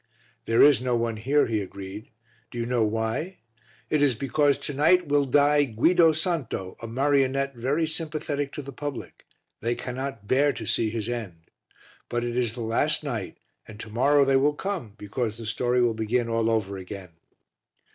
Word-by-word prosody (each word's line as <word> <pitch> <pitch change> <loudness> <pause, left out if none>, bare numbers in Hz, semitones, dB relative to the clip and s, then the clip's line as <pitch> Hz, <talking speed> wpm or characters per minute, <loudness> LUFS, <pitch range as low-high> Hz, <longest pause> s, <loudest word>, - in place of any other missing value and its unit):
"There 115 +1 +4
is 145 -4 +6
no 125 -1 0
one 115 -1 -1
here," 140 +7 +2
he 110 -2 -1
agreed; 100 +2 -8 0.4
"do - - -9
you 115 - -1
know 120 -1 +1
why? 110 - -2 0.5
It 150 - +1
is 140 -4 +3
because 140 +3 +2
to 145 - -4
night 175 +6 +4
will 145 -1 +2
die 145 +2 +4
Guido 160 +8 +4
Santo, 155 - -2
a 115 - -5
marionette 135 +2 +1
very 135 +7 0
sympathetic 155 -3 -3
to 145 - -6
the 140 - -8
public, 145 +1 -7 0.3
they 120 +2 -1
cannot 130 -4 -5
bear 140 +4 +3
to - - -6
see 110 - +1
his 110 -1 -3
end. 110 -9 -5 0.7
But 120 0 -1
it 120 0 -3
is 120 -3 0
the 120 - -6
last 115 +8 0
night 115 -10 -4 0.3
and 110 -1 -11
to 110 - -7
morrow 140 +5 +4
they 135 0 +4
will 145 +2 +2
come 170 - -4
because 110 +2 -3
the 115 - -8
story 120 +3 +1
will 120 -1 +2
begin 115 +2 0
all 115 0 +1
over 100 -3 -1
again." 95 0 -8
125 Hz, 180 wpm, -26 LUFS, 115-145 Hz, 0.7 s, is